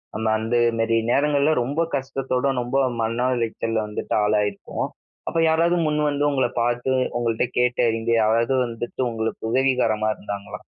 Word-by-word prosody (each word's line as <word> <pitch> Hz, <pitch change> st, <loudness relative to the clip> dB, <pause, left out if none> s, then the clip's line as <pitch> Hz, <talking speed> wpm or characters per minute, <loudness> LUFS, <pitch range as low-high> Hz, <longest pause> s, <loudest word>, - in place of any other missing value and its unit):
நம்ம 110 Hz, +1 st, -2 dB
அந்த 115 Hz, +2 st, -1 dB, 0.2 s
மேரி 115 Hz, 0 st, +2 dB
நேரங்கள்ல 145 Hz, +2 st, +3 dB
ரொம்ப 140 Hz, +6 st, -1 dB
கஷ்டத்தோடு 135 Hz, 0 st, -1 dB
ரொம்ப 125 Hz, +2 st, -2 dB, 0.2 s
மன 115 Hz, +3 st, 0 dB
உளைச்சல்ல 115 Hz, -1 st, -1 dB
வந்துட்டு 105 Hz, -, -3 dB
ஆளாயிருப்போம். 105 Hz, -1 st, -1 dB, 0.4 s
அப்ப 165 Hz, -, -1 dB
யாராவது 165 Hz, +2 st, +3 dB
முன் 150 Hz, 0 st, 0 dB
வந்து 145 Hz, 0 st, -1 dB
உங்கள 130 Hz, -2 st, +1 dB, 0.2 s
பாத்து 120 Hz, +2 st, 0 dB, 0.3 s
உங்கள்ட்ட 115 Hz, 0 st, 0 dB
கேட்டு 125 Hz, 0 st, +2 dB
இங்க 115 Hz, +1 st, -2 dB
யாராவது 115 Hz, +4 st, +2 dB
வந்துட்டு 120 Hz, +1 st, -5 dB
உங்களுக்கு 115 Hz, 0 st, -3 dB
உதவிகரமா 125 Hz, -5 st, +2 dB
இருந்தாங்களா? 100 Hz, -1 st, -7 dB
120 Hz, 140 wpm, -23 LUFS, 110-135 Hz, 0.4 s, நேரங்கள்ல